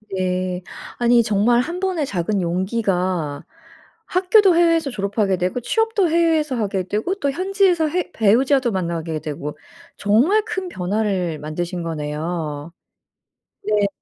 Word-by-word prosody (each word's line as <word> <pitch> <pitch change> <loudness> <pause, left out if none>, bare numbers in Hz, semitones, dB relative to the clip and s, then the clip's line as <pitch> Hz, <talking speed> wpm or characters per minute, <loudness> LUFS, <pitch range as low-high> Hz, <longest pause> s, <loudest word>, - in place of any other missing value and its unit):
네. 185 -1 -2 0.3
아니 240 -1 +4
정말 220 +3 +3
1 340 +7 -4
번의 365 -6 -1
작은 195 -1 -1
용기가 180 -4 -1 0.6
학교도 370 0 +4
해외에서 330 -3 +3
졸업하게 200 -3 -1
되고 180 +7 -1
취업도 435 - +1
해외에서 320 -4 +2
하게 200 -4 -1
되고 215 - -2
또 285 -8 -1
현지에서 370 -1 +2
해 360 +3 -2
배우자도 245 +4 +3
만나게 170 -4 -2
되고 150 -1 -6 0.4
정말 265 - +3
큰 375 -1 -4
변화를 185 - -1
만드신 170 +3 -4
거네요. 155 0 -4 0.9
네. 210 -1 +2
210 Hz, 275 characters per minute, -21 LUFS, -, 0.9 s, 아니